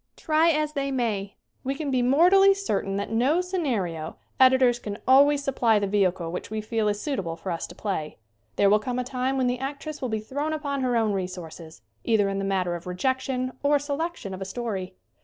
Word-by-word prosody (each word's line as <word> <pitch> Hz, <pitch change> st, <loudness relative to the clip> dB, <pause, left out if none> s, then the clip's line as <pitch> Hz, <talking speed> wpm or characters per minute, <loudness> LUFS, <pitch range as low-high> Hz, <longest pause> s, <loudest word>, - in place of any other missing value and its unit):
Try 315 Hz, +1 st, +3 dB
as 305 Hz, -1 st, 0 dB
they 275 Hz, -2 st, -1 dB
may, 210 Hz, -6 st, -2 dB, 0.3 s
we 270 Hz, +1 st, -2 dB
can 290 Hz, -1 st, -3 dB
be 255 Hz, -1 st, +2 dB
mortally 360 Hz, +10 st, +5 dB
certain 205 Hz, -, -2 dB
that 200 Hz, +2 st, -3 dB
no 255 Hz, +9 st, +2 dB
scenario 235 Hz, -, -2 dB, 0.2 s
editors 260 Hz, -2 st, +5 dB
can 205 Hz, -3 st, -6 dB
always 285 Hz, +2 st, +5 dB
supply 240 Hz, -5 st, +2 dB
the 205 Hz, -, 0 dB
vehicle 185 Hz, -4 st, 0 dB
which 180 Hz, -, -5 dB
we 220 Hz, 0 st, -3 dB
feel 215 Hz, 0 st, -1 dB
is 205 Hz, 0 st, 0 dB
suitable 195 Hz, -, -3 dB
for 185 Hz, +2 st, -5 dB
us 165 Hz, -, -3 dB
to -, -, -12 dB
play. 170 Hz, -8 st, -4 dB, 0.4 s
There 200 Hz, -, +4 dB
will 210 Hz, +2 st, +5 dB
come 245 Hz, +3 st, -3 dB
a 250 Hz, -, 0 dB
time 260 Hz, +1 st, -2 dB
when 260 Hz, -, +1 dB
the 245 Hz, 0 st, 0 dB
actress 285 Hz, +3 st, -5 dB
will 255 Hz, -, -2 dB
be 220 Hz, -1 st, -1 dB
thrown 285 Hz, +8 st, -3 dB
upon 285 Hz, -3 st, -2 dB
her 250 Hz, -2 st, +1 dB
own 220 Hz, -2 st, +1 dB
resources, 180 Hz, -4 st, -6 dB, 0.2 s
either 215 Hz, -4 st, +2 dB
in 195 Hz, 0 st, -2 dB
the 195 Hz, -, -2 dB
matter 185 Hz, -3 st, 0 dB
of 170 Hz, +1 st, -8 dB
re 180 Hz, -, -4 dB
jection 260 Hz, +2 st, -1 dB
or 290 Hz, +1 st, +3 dB
selection 285 Hz, -, -4 dB
of 190 Hz, -, -7 dB
a -, -, -3 dB
story. 190 Hz, -3 st, -4 dB
245 Hz, 215 wpm, -25 LUFS, 195-280 Hz, 0.4 s, mortally